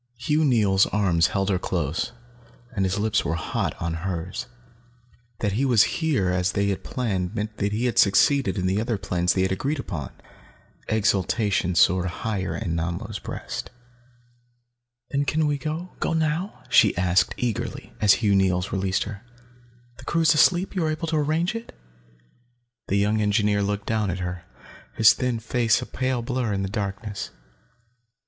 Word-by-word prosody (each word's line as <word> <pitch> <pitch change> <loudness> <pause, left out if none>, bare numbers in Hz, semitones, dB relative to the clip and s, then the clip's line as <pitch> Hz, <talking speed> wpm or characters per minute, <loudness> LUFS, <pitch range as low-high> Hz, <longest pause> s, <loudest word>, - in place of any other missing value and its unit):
Hugh 150 +6 +1
Neils' 105 -8 +3
arms 90 -6 +2
held 95 +1 -1
her 95 - +1
close, 85 -4 -2 0.6
and 95 -2 +1
his 95 +1 -1
lips 105 0 +1
were 80 - -1
hot 85 - -3
on 85 -1 -2
hers. 90 +5 -4 0.9
That 105 - +1
he 115 +8 0
was 120 -5 +5 0.2
here 135 - +1
as 90 0 0
they 100 0 +1
had 100 - -3
planned 100 -6 -2
meant 110 0 -4
that 100 0 -1
he 110 +4 -1
had 120 - +1
succeeded 120 +7 +4
in 90 - -1
the 95 +3 +1
other 115 -1 -1
plans 90 -2 0
they 95 - +2
had 95 - 0
agreed 140 +11 -1
upon. 85 - -5 0.8
Exultation 100 -3 +1
soared 90 +2 +4
higher 95 +1 -3
in 85 -2 -3
Nanlo's 85 +1 -3
breast. - - -6 1.4
"Then 140 0 +1 0.2
we 145 -1 0
can 155 +3 -2
go? 180 +2 -9
Go - - 0
now?" 160 +5 -1
she - - +4
asked 90 +1 +2
eagerly, 120 -5 -3
as 105 -2 +6
Hugh 100 0 +2
Neils 95 -1 +1
released 95 -1 0
her. 105 +1 -8 0.8
"The 130 - -11
crew 165 - 0
is 160 -1 +5
asleep? 180 +5 +3
You 185 - 0
were 160 - +1
able 155 +1 -3
to 160 - 0
arrange 155 +5 +1
it?" 230 0 -8 1.1
The 100 - +1
young 105 +2 +2
engineer 105 -1 +2
looked 100 0 -2
down 110 -3 0
at 90 - -2
her, 90 -1 -5 0.5
his 110 - +7
thin 125 -2 -1
face 115 0 +1
a 125 - -5
pale 130 -2 -2
blur 125 -3 -1
in 95 0 -1
the 95 - -3
darkness. 100 0 -4
105 Hz, 170 wpm, -24 LUFS, 95-125 Hz, 1.4 s, his